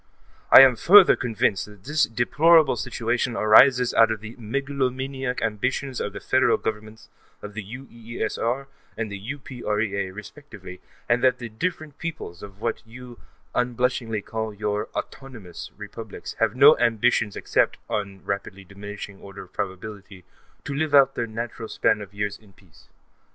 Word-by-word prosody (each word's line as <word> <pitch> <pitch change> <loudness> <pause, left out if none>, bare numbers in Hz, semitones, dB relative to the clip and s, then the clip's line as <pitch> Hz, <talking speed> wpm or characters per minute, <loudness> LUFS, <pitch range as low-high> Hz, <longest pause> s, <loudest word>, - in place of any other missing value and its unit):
I - - +11
am 130 -2 +7
further 195 - +7
convinced 110 -5 -1
that 105 -2 -16
this 150 +2 +1
deplorable 155 +7 +4
situation 120 0 -2
arises 125 +3 +5
out 115 0 +5
of 110 -1 -2
the 110 +2 -10
megalomaniac 130 +1 -3
ambitions 125 +4 -2
of - - -4
the - - -6
Federal - - +2
Governments 110 0 -6 0.4
of 105 - -8
the 105 0 -6
UEESR 120 +2 -4 0.3
and 110 -2 -3
the 100 - -6
UPREA, 105 -6 -3
respectively, 105 -3 -11 0.3
and 120 +1 +1
that 130 -1 +4
the 120 -2 -7
different 155 +4 -4
peoples 160 - -6
of 100 -1 -11
what - - -2
you 120 +1 -12 0.3
unblushingly 125 -3 -1
call 110 -1 -4
your 105 +1 -2
"autonomous" 115 -10 -8
republics - - -8
have - - +1
no - - +8
ambitions 115 -2 +1
except, - - 0
on 100 -2 -4
a - - -27
rapidly 100 -1 -4
diminishing 100 +1 -9
order 100 0 -10
of 90 - -20
probability, 95 -1 -7 0.4
to 145 - -5
live 145 +1 0
out 135 -1 +6
their 115 - -3
natural 115 0 -6
span 105 - +1
of 100 -1 -9
years 100 0 -4
in 105 -3 -21
peace. 90 -6 -23
115 Hz, 150 wpm, -24 LUFS, 105-130 Hz, 0.4 s, I